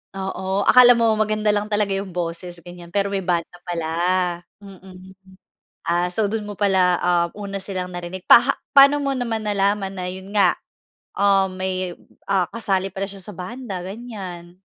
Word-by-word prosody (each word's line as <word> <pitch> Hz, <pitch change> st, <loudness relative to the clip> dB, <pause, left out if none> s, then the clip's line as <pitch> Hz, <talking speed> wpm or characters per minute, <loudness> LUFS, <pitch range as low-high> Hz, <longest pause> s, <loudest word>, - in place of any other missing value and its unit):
Oo. 190 Hz, +1 st, -2 dB
Akala 250 Hz, -1 st, +8 dB
mo 230 Hz, -2 st, +3 dB
maganda 215 Hz, -1 st, +1 dB
lang 210 Hz, +1 st, -2 dB
talaga 205 Hz, -2 st, +1 dB
'yong 195 Hz, -1 st, -4 dB
boses, 175 Hz, 0 st, -5 dB
ganyan 175 Hz, 0 st, -12 dB
pero 200 Hz, +1 st, +1 dB
may 195 Hz, -1 st, -2 dB
banda 175 Hz, -1 st, -2 dB
pala. 165 Hz, -2 st, -3 dB, 0.7 s
Mm. 190 Hz, -1 st, -14 dB, 0.7 s
Ah, 175 Hz, +1 st, +1 dB
so 210 Hz, +1 st, 0 dB
do'n 215 Hz, 0 st, -3 dB
mo 205 Hz, -, -6 dB
pala, 190 Hz, -3 st, +2 dB
ah, 175 Hz, -1 st, +2 dB
una 200 Hz, -1 st, -6 dB
silang 190 Hz, -2 st, -5 dB
narinig. 175 Hz, +1 st, -7 dB
Paha 245 Hz, +4 st, +7 dB, 0.2 s
paano 280 Hz, +1 st, +8 dB
mo 275 Hz, -1 st, -1 dB
naman 235 Hz, -3 st, -2 dB
nalaman 200 Hz, -1 st, 0 dB
na 185 Hz, -, -4 dB
'yon 190 Hz, +3 st, -7 dB
nga, 190 Hz, -4 st, +5 dB, 0.6 s
um, 195 Hz, -1 st, +2 dB
may, 185 Hz, -1 st, -3 dB, 0.3 s
ah, 190 Hz, -3 st, +1 dB
kasali 195 Hz, -4 st, -1 dB
pala 195 Hz, +1 st, -4 dB
siya 195 Hz, -1 st, -8 dB
sa 205 Hz, -1 st, -10 dB
banda, 190 Hz, -1 st, -6 dB
ganiyan? 190 Hz, -5 st, -8 dB
195 Hz, 165 wpm, -22 LUFS, 180-210 Hz, 0.7 s, Akala